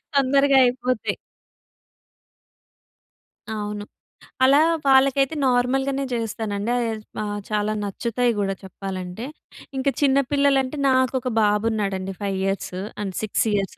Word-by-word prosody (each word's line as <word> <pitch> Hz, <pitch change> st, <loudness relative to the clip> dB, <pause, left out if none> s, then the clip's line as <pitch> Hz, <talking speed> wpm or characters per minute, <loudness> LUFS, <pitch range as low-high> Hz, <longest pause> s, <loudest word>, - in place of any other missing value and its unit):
తొందరగా 275 Hz, 0 st, +4 dB
అయిపోతాయి. 250 Hz, -1 st, -1 dB, 2.3 s
అవును. 210 Hz, -1 st, -4 dB, 0.6 s
అలా 275 Hz, +2 st, +6 dB, 0.3 s
వాళ్ళకైతే 270 Hz, +2 st, +4 dB
నార్మల్‌గనే 265 Hz, +2 st, +1 dB
చేస్తానండి. 220 Hz, -2 st, -2 dB
అద్ 225 Hz, -3 st, -2 dB, 0.2 s
ఆ! -, -, -3 dB, 0.2 s
చాలా 210 Hz, 0 st, 0 dB
నచ్చుతాయి 235 Hz, +4 st, 0 dB
కూడా 195 Hz, -1 st, 0 dB
చెప్పాలంటే. 190 Hz, +2 st, -6 dB, 0.5 s
ఇంకా 275 Hz, +1 st, +1 dB
చిన్న 275 Hz, -1 st, +4 dB
పిల్లలంటే 280 Hz, -1 st, +2 dB
నాకొక 260 Hz, -1 st, +1 dB
బాబు 210 Hz, +1 st, +2 dB
ఉన్నాడండి. 195 Hz, -3 st, -2 dB
5 195 Hz, -1 st, -1 dB
ఇయర్స్ 195 Hz, -1 st, -2 dB, 0.3 s
అండ్ 195 Hz, -2 st, -3 dB
6 215 Hz, -, 0 dB
ఇయర్స్. 195 Hz, -1 st, -1 dB
235 Hz, 105 wpm, -23 LUFS, 205-265 Hz, 2.3 s, అలా